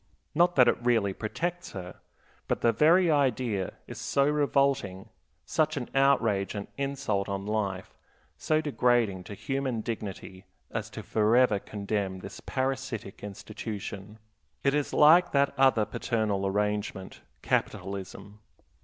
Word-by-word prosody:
Not 175 +2 +3
that 125 -2 +6
it - - +1
really 115 -5 +2
protects 175 - -4
her, 90 -2 -7 0.5
but - - -1
the 115 - +4
very 165 +8 +4
idea 125 -9 0
is - - -8
so 140 0 +2
revolting, 140 -9 +1 0.4
such 155 -1 0
an 125 - -5
outrage 115 -8 +2
and 100 -1 -5
insult 135 -8 -2
on 100 0 -3
life, 100 -3 -2 0.4
so 155 0 +1
degrading 120 - +1
to 105 - -8
human 135 -1 -2
dignity, 100 -4 -6 0.3
as 110 -1 -4
to 110 -1 -8
forever 110 +1 +3
condemn 100 -2 -3
this - - -9
parasitic 130 -7 -3
institution. 105 0 -7 0.5
It 140 - +3
is 145 -1 0
like 170 +4 +6
that 140 0 +3
other 130 -5 +4
paternal 105 -3 -1
arrangement 105 -1 -2 0.2
capitalism. 100 +1 -3
110 Hz, 125 wpm, -28 LUFS, 100-140 Hz, 0.5 s, that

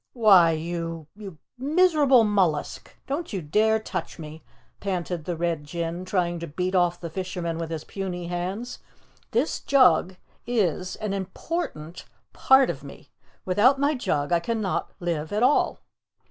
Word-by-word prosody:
"Why, 200 -8 +6
you 165 0 -4
you 200 -6 -10 0.2
miserable 295 -4 +4
mollusk 190 -8 0
don't 300 +5 -4
you 195 - -2
dare 215 +8 +2
touch 220 - -5
me!" 155 -1 -9 0.4
panted 175 -4 -3
the 175 -2 -3
Red 170 -2 -1
Jinn, 170 +3 -4
trying 175 -2 -1
to 170 - -6
beat 180 +5 -3
off 175 -1 +2
the 170 - -6
fisherman 175 -2 -4
with 165 -1 -4
his 160 -2 -4
puny 185 -3 -5
hands. 185 +8 -4 0.5
"This 245 +6 0
jug 190 - +4 0.3
is 185 -6 0
an 210 -2 -4
important 190 - -5 0.3
part 265 0 +5
of - - -10
me. - - -12 0.3
Without 225 +9 +4
my 285 +2 +2
jug 150 - -1
I 170 - +4
cannot 215 +1 -2
live 165 -4 -3
at 210 +3 0
all." 270 +4 +2
185 Hz, 145 wpm, -25 LUFS, 170-220 Hz, 0.5 s, Why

